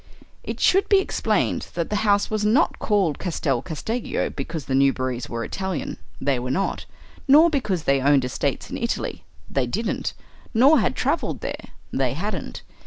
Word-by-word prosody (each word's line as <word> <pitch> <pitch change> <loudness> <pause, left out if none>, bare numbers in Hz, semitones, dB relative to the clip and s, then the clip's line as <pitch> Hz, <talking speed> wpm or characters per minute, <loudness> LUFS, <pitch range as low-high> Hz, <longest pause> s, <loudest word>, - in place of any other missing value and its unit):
It - - -5
should 385 +2 +3
be 400 - +6
explained 385 - 0
that 170 +2 -2
the 210 - +1
house 205 -1 +2
was 215 -1 0
not 230 +10 +2
called 195 -9 +1
Castel 145 -8 -1
Casteggio 220 +8 -3
because 150 +1 -5
the 135 - -3
Newberrys 130 -2 +1
were 115 -1 -3
Italian: 190 -3 -4 0.2
they 135 -2 +1
were 125 +1 -4
not; 195 +9 -1 0.4
nor 310 +5 +7
because 210 - -1
they 140 -3 +2
owned 140 -1 +4
estates 125 - -2
in - - -3
Italy: - - -3 0.2
they 135 -3 0
didn't 215 - -2 0.4
nor 275 +7 +6
had - - 0
travelled - - -1
there: - - -5 0.3
they - - +1
hadn't. - - -4
170 Hz, 165 wpm, -23 LUFS, 135-220 Hz, 0.4 s, nor